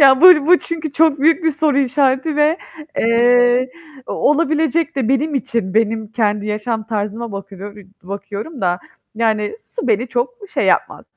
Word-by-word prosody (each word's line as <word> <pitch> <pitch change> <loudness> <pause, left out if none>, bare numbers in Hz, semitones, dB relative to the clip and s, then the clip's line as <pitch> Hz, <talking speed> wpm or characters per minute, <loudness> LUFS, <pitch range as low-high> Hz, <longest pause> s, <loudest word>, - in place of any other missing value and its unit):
Ya, 270 -2 +6
bu 340 -5 +7
bu 360 +1 +6
çünkü 320 -3 -5
çok 310 -2 +2
büyük 325 +3 +3
bir 320 - +3
soru 295 -1 0
işareti 270 +3 +1
ve, 300 +3 +2 0.4
eee, 245 +2 +3 0.4
o - - -5
olabilecek 315 +1 +1
de 255 -5 -1
benim 285 +3 0
için, 235 -8 -2
benim 220 0 +1
kendi 210 -2 0
yaşam 215 +1 -3
tarzıma 220 +1 -4
bakıyor 200 +1 -9
iii, 200 -2 -14
bakıyorum 200 - -7
da 180 -1 0 0.4
yani 215 -2 0
su 450 - -6
beni 230 +3 +1
çok 245 - -2 0.2
şey - - 0
yapmaz. - - 0
245 Hz, 160 wpm, -18 LUFS, 215-300 Hz, 0.4 s, bu